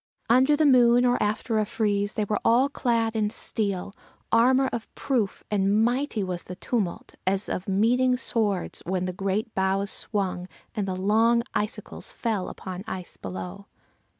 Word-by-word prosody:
Under 260 +5 +5
the 310 - +3
moon 245 -2 +6
or 245 0 +2
after 215 +2 0
a 215 - +1
freeze 205 -1 0
they 215 - 0
were 210 +1 -1
all 250 +4 +4
clad 230 -5 0
in 215 -1 +1
steel, 200 -3 -3 0.4
armor 255 +4 +4
of 230 -2 -5
proof, 235 -8 -1
and 205 +2 +3
mighty 245 -3 0
was 180 -2 -4
the 180 - -7
tumult, 195 -2 -3
as 195 +1 +2
of 185 - -4
meeting 250 +6 +3
swords, 210 -7 -1
when 185 0 0
the 185 - -3
great 200 +3 -2
boughs 195 +1 0
swung, 185 -4 -1 0.3
and 210 -3 -2
the 185 - -2
long 225 +5 +3
icicles 210 - -4
fell 225 - -2
upon 185 0 -7
ice 185 -2 -6
below. 95 -1 -7
210 Hz, 160 wpm, -26 LUFS, 190-235 Hz, 0.4 s, moon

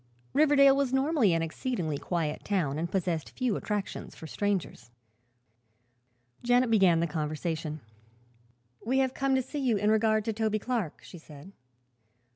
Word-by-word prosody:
Riverdale 280 -2 +5
was 275 -2 0
normally 265 - +2
an 165 0 +1
exceedingly 165 - -3
quiet 160 -4 -3
town 155 -8 -1
and 170 +1 -2
possessed 175 -5 -2
few 250 -5 0
attractions 205 -1 -4
for - - -10
strangers. 185 - -3 1.5
Janet 245 0 +2
began 185 -6 +4
the - - +2
conversation. 155 0 -3 1.0
"We 255 +4 0
have 265 -1 +1
come 270 -1 0
to 260 - +1
see 290 +4 -6
you 250 -6 +1
in 210 +2 +2
regard 215 -1 +2
to 225 - -1
Toby 215 0 0
Clark," 215 -7 -3
she 175 - -11
said. 150 +3 -13
205 Hz, 145 wpm, -28 LUFS, 165-255 Hz, 1.5 s, Riverdale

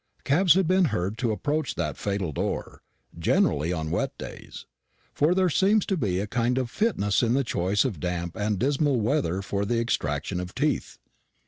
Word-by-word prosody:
Cabs 170 +4 +4
had 190 -3 +2
been 185 +1 +4
heard 95 - -1
to 120 -3 +1
approach 150 +8 -1
that 75 -5 -2
fatal 100 -5 -2
door - - -4 0.4
generally 75 +4 +2
on 80 -3 -3
wet - - -1
days; - - -9 0.5
for 155 +5 +2
there 185 -1 +3
seems 195 +5 +3
to 195 - 0
be 100 - 0
a 100 - -1
kind 120 +3 0
of 125 -2 -1
fitness 150 - +1
in 120 0 +2
the 140 - +2
choice 100 -1 0
of 105 - -3
damp 85 0 -3
and 105 -1 -1
dismal 140 +2 +1
weather 105 - 0
for 100 +1 -2
the 115 +3 0
extraction 80 -6 -1
of 90 0 -6
teeth. 150 0 -1
115 Hz, 185 wpm, -26 LUFS, 90-145 Hz, 0.5 s, Cabs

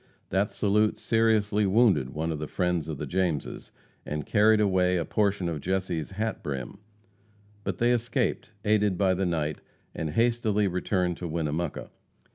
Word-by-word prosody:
That 95 +2 +1
salute 105 +1 +1
seriously 110 -2 +2
wounded 95 - +3
one 80 +3 -3
of 80 - -3
the 75 - -4
friends 90 -3 -1
of 80 -3 -4
the 75 - -4
Jameses, 85 -1 -2 0.3
and 75 0 -4
carried 110 0 +4
away 95 -3 +2
a 85 - -1
portion 100 0 0
of 80 -4 -3
Jesse's 90 -4 -2
hat 110 +2 -3
brim. 65 -4 -5 0.8
But - - -3
they 120 +1 +3
escaped, 120 -1 0 0.2
aided 105 -3 +2
by 95 -1 +3
the 95 0 0
night, 75 -3 -2 0.3
and 80 - -3
hastily 110 +1 +1
returned 90 -1 -1
to 90 - -5
Winnemucca. 80 0 -3
95 Hz, 155 wpm, -27 LUFS, 80-105 Hz, 0.8 s, carried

